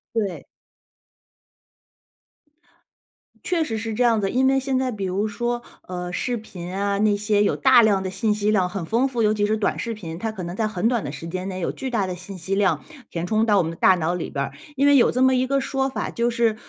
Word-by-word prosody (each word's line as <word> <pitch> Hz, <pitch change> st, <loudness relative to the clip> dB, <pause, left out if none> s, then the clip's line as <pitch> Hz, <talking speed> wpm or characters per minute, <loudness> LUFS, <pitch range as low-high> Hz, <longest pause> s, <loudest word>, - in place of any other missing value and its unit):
对。 200 Hz, -6 st, -2 dB, 3.0 s
确 350 Hz, -2 st, +1 dB
实 230 Hz, -8 st, -1 dB
是 225 Hz, 0 st, -4 dB
这 245 Hz, +3 st, +2 dB
样 225 Hz, -2 st, +3 dB
子， 195 Hz, -, -1 dB
因 260 Hz, +1 st, +3 dB
为 270 Hz, 0 st, +3 dB
现 265 Hz, -1 st, 0 dB
在 260 Hz, -1 st, 0 dB
比 210 Hz, -5 st, -5 dB
如 190 Hz, +3 st, 0 dB
说， 240 Hz, +3 st, -2 dB, 0.3 s
呃， 180 Hz, -1 st, -4 dB
视 245 Hz, +5 st, -1 dB
频 180 Hz, -5 st, -8 dB
啊， 200 Hz, +1 st, 0 dB
那 210 Hz, -1 st, +3 dB
些 205 Hz, 0 st, +2 dB
有 -, -, +1 dB
大 260 Hz, -3 st, +6 dB
量 205 Hz, -4 st, +3 dB
的 190 Hz, -, -3 dB
信 200 Hz, +3 st, 0 dB
息 210 Hz, 0 st, 0 dB
量 185 Hz, -4 st, +2 dB
很 180 Hz, -2 st, -4 dB
丰 230 Hz, +9 st, +1 dB
富， 240 Hz, -3 st, -2 dB
尤 215 Hz, -1 st, +3 dB
其 205 Hz, -1 st, +1 dB
是 215 Hz, +1 st, +1 dB
短 210 Hz, -, 0 dB
视 230 Hz, -, -3 dB
频， 165 Hz, -7 st, -7 dB
它 220 Hz, +5 st, -3 dB
可 195 Hz, -4 st, -7 dB
能 175 Hz, +1 st, -5 dB
在 220 Hz, -, 0 dB
很 215 Hz, 0 st, 0 dB
短 235 Hz, -3 st, 0 dB
的 -, -, -4 dB
时 150 Hz, +3 st, -7 dB
间 185 Hz, +3 st, -4 dB
内 185 Hz, -1 st, -5 dB
有 175 Hz, -, -1 dB
巨 265 Hz, -, -4 dB
大 215 Hz, -6 st, 0 dB
的 180 Hz, -, -4 dB
信 185 Hz, +2 st, -9 dB
息 185 Hz, +3 st, -2 dB
量 195 Hz, -1 st, +1 dB, 0.2 s
填 170 Hz, 0 st, -4 dB
充 215 Hz, +3 st, +2 dB
到 210 Hz, -3 st, +3 dB
我 190 Hz, -, +4 dB
们 165 Hz, -, -3 dB
的 -, -, -8 dB
大 185 Hz, -, +5 dB
脑 170 Hz, -1 st, -1 dB
里 180 Hz, -, -4 dB
边 140 Hz, -1 st, -2 dB
儿。 -, -, -9 dB, 0.2 s
因 280 Hz, +2 st, +4 dB
为 285 Hz, -, +6 dB
有 255 Hz, -, +5 dB
这 255 Hz, -, -1 dB
么 260 Hz, 0 st, +5 dB
一 255 Hz, 0 st, +2 dB
个 275 Hz, +1 st, +1 dB
说 270 Hz, 0 st, -1 dB
法， 265 Hz, -, -3 dB
就 235 Hz, +1 st, 0 dB
是 230 Hz, -2 st, +1 dB
210 Hz, 270 characters per minute, -23 LUFS, 185-240 Hz, 3.0 s, 大